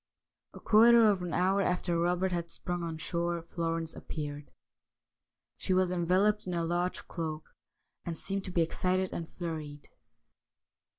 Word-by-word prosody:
A -, -, -9 dB
quarter 230 Hz, +1 st, +6 dB
of 200 Hz, -3 st, +2 dB
an. 180 Hz, -1 st, -4 dB
hour 190 Hz, +2 st, +2 dB
after 180 Hz, -2 st, 0 dB
Robert 180 Hz, +2 st, +1 dB
had 170 Hz, -1 st, -2 dB
sprung 175 Hz, +1 st, -3 dB
on 165 Hz, -1 st, -4 dB
shore 170 Hz, +1 st, -1 dB
Florence 165 Hz, -1 st, -3 dB
appeared. 145 Hz, -1 st, -6 dB, 1.1 s
She 185 Hz, -, 0 dB
was 185 Hz, -1 st, +2 dB
enveloped 185 Hz, +4 st, +2 dB
in 180 Hz, -, -2 dB
a 170 Hz, -1 st, 0 dB
large 175 Hz, +2 st, -1 dB
cloak, 160 Hz, -2 st, -5 dB, 0.5 s
and 165 Hz, -2 st, -4 dB
seemed 195 Hz, 0 st, -2 dB
to 185 Hz, -, -4 dB
be 175 Hz, -, +2 dB
excited 185 Hz, +3 st, 0 dB
and 165 Hz, -1 st, -5 dB
flurried. 155 Hz, -4 st, -6 dB
175 Hz, 145 wpm, -30 LUFS, 165-185 Hz, 1.1 s, quarter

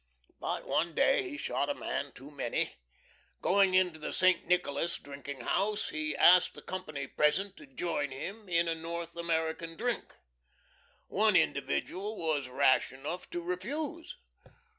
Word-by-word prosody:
But -, -, -3 dB
one 165 Hz, +1 st, 0 dB
day -, -, +3 dB
he 295 Hz, -, -6 dB
shot -, -, -1 dB
a 290 Hz, -, 0 dB
man 140 Hz, -, -3 dB
too 135 Hz, +3 st, -12 dB
many. 135 Hz, -5 st, -1 dB, 0.7 s
Going 195 Hz, -1 st, +4 dB
into 180 Hz, -4 st, +3 dB
the 150 Hz, -, -4 dB
St. 185 Hz, -1 st, +3 dB
Nicholas 170 Hz, -2 st, +1 dB
drinking 140 Hz, -1 st, -8 dB
house 205 Hz, -, 0 dB
he 155 Hz, -1 st, -2 dB
asked 180 Hz, 0 st, +7 dB
the -, -, -10 dB
company 155 Hz, -7 st, -4 dB
present 185 Hz, +8 st, +1 dB
to 290 Hz, -, -13 dB
join 170 Hz, -, -2 dB
him 195 Hz, +10 st, -7 dB
in 170 Hz, -1 st, +3 dB
a 165 Hz, -, +2 dB
North 165 Hz, +1 st, -5 dB
American 165 Hz, -1 st, -1 dB
drink. 245 Hz, -1 st, -2 dB, 0.9 s
One -, -, +3 dB
individual 195 Hz, -, 0 dB
was 150 Hz, -5 st, -1 dB
rash 130 Hz, +1 st, +3 dB
enough 150 Hz, +7 st, -6 dB
to 175 Hz, -, -4 dB
refuse. 285 Hz, -, -4 dB
170 Hz, 145 wpm, -31 LUFS, 150-195 Hz, 0.9 s, asked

